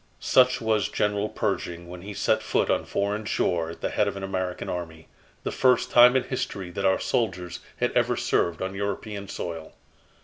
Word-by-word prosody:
Such 125 0 +4
was 110 -3 +1
General 105 0 0
Pershing 85 0 -3
when 90 0 -9
he 100 +2 -8
set - - +2
foot - - +1
on - - 0
foreign 105 +2 -1
shore 85 -5 0
at 85 - -9
the - - -2
head 105 - +2
of 100 -1 -3
an 100 - -6
American 95 -1 -3
army 80 -2 -5 0.4
the - - -2
first 125 -2 +3
time 125 +1 +8
in 130 - +3
history 100 -8 -4
that 100 +2 -3
our 95 0 +3
soldiers 90 -6 -1 0.2
had - - +1
ever - - +1
served 85 +1 0
on 95 0 -3
European 100 +1 -4
soil. 80 -3 -6
100 Hz, 190 wpm, -26 LUFS, 90-105 Hz, 0.4 s, time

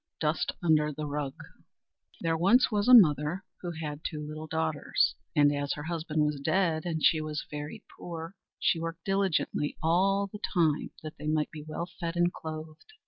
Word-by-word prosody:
Dust 155 0 0
under 155 -2 +3
the 150 +1 -5
Rug 145 -2 -3
MAUD - - -10
LINDSAY - - -25
There 165 -1 +1
was 230 +10 +4
once 205 0 +1
a 255 - +7
mother, 155 - +5 0.2
who 175 - -4
had 155 -3 -5
two 150 -2 -4
little 155 +1 -7
daughters; 160 -1 +1 0.2
and, 145 -1 +5
as 145 -1 -1
her 150 - -6
husband 160 -2 -1
was 150 -1 -1
dead 160 +2 +1
and 160 -2 -2
she 155 - +4
was 155 -1 -4
very 150 0 -6 0.2
poor, 165 0 -6 0.2
she 165 - +2
worked 165 0 -5
diligently 195 -6 0
all 195 +5 +3
the 200 +1 -9
time 165 -7 +1
that 155 0 -8
they 150 - -5
might 155 0 +1
be 155 - -8
well 155 +3 -5
fed 170 -1 -3
and 175 0 +2
clothed. 155 - -8
160 Hz, 190 wpm, -29 LUFS, 150-175 Hz, 0.2 s, a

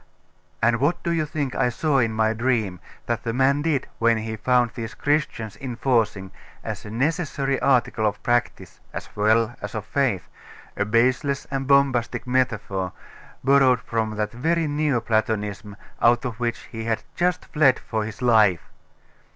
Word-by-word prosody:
'And 115 +1 +4
what 170 +6 0
do 170 - -1
you 160 -2 0
think 145 -3 -3
I 125 -2 +1
saw 140 +3 +1
in 115 -3 +2
my 110 0 +1
dream 110 -6 0 0.3
that 120 -1 -1
that 115 - -3
man 135 +3 +2
did 150 -4 0
when 115 0 +3
he 110 0 -4
found 120 +2 +2
these 115 -2 -6
Christians 140 -8 -1
enforcing, 115 -6 0 0.3
as - - -5
a - - -7
necessary 140 +2 -1
article 120 -4 +2
of 100 - -4
practice, 120 0 -1
as - - -8
well 110 +3 +2
as 105 +1 -6
of 110 -1 -4
faith, 120 -9 0 0.5
a 100 - 0
baseless 130 +6 +1
and 135 -1 -2
bombastic 140 -4 +2
metaphor, 105 -7 -1 0.5
borrowed 135 -2 +5
from 110 -1 -2
that 105 0 -2
very 165 +7 0
Neo 145 -4 0
Platonism 105 -2 -1 0.3
out 120 +2 +4
of 120 -2 -4
which 120 -1 -2
he 115 0 -5
had 115 -1 -1
just 180 0 0
fled 140 -4 +3
for 110 -2 -3
his 110 +3 -7
life? 105 - +3
120 Hz, 160 wpm, -23 LUFS, 110-135 Hz, 0.5 s, borrowed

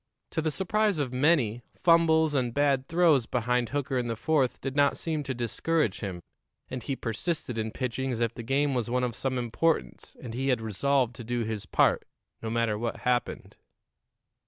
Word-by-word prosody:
To - - -1
the 160 - 0
surprise 205 +4 +1
of 135 -4 -2
many, 125 -5 +2
fumbles 160 -3 +4
and 125 -4 0
bad 140 -2 +2
throws 160 -8 +3
behind 125 0 0
Hooker 140 -2 -1
in 120 - -2
the 115 - -2
fourth 135 +1 +1
did 135 0 -4
not 145 -1 +3
seem 160 -2 -2
to 135 -3 -4
discourage 120 - 0
him, 95 -5 -5 0.5
and 130 -1 -4
he 135 - -3
persisted 125 +1 -3
in 110 0 -1
pitching 130 +2 -3
as 115 - -3
if 115 -1 0
the 120 - -7
game 135 +4 +1
was 120 -2 -1
one 125 +1 +1
of 125 -1 -1
some 130 +2 -2
importance 120 - -1
and 115 - -7
he 130 +3 -2
had 125 -3 +2
resolved 120 +3 +1
to 120 - -7
do 120 +1 -1
his 110 -3 -4
part, - - +3 0.4
no 115 - -3
matter 115 -2 0
what 115 0 -3
happened. 125 -1 -1
125 Hz, 190 wpm, -28 LUFS, 115-145 Hz, 0.5 s, fumbles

